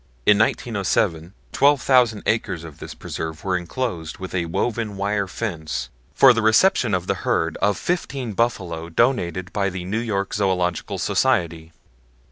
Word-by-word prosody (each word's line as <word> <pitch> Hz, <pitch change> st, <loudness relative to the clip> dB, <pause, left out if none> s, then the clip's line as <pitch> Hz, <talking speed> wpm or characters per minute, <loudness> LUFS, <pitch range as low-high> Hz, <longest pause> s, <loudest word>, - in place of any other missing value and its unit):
In 105 Hz, -1 st, +5 dB
1907, 100 Hz, -6 st, 0 dB, 0.2 s
12,000 130 Hz, -6 st, +3 dB
acres 100 Hz, -6 st, -1 dB
of 80 Hz, -3 st, -11 dB
this -, -, -8 dB
preserve 80 Hz, -1 st, -6 dB
were 95 Hz, -1 st, 0 dB
inclosed 90 Hz, -3 st, -3 dB
with 95 Hz, -1 st, -7 dB
a 90 Hz, -2 st, 0 dB
woven 105 Hz, +3 st, -2 dB
wire 100 Hz, 0 st, -1 dB
fence 85 Hz, -7 st, -4 dB, 0.3 s
for 135 Hz, -2 st, +7 dB
the 115 Hz, -, 0 dB
reception 110 Hz, -, +4 dB
of 90 Hz, -1 st, -2 dB
the -, -, +1 dB
herd -, -, 0 dB
of 105 Hz, -2 st, +1 dB
fifteen 140 Hz, -9 st, -2 dB
buffalo 90 Hz, -8 st, -1 dB
donated 90 Hz, -4 st, 0 dB
by 100 Hz, -1 st, 0 dB
the 90 Hz, -1 st, -6 dB
New 105 Hz, +5 st, -1 dB
York 100 Hz, -4 st, -2 dB
Zoological 90 Hz, -4 st, 0 dB
Society. 80 Hz, -1 st, 0 dB
100 Hz, 145 wpm, -22 LUFS, 85-115 Hz, 0.3 s, for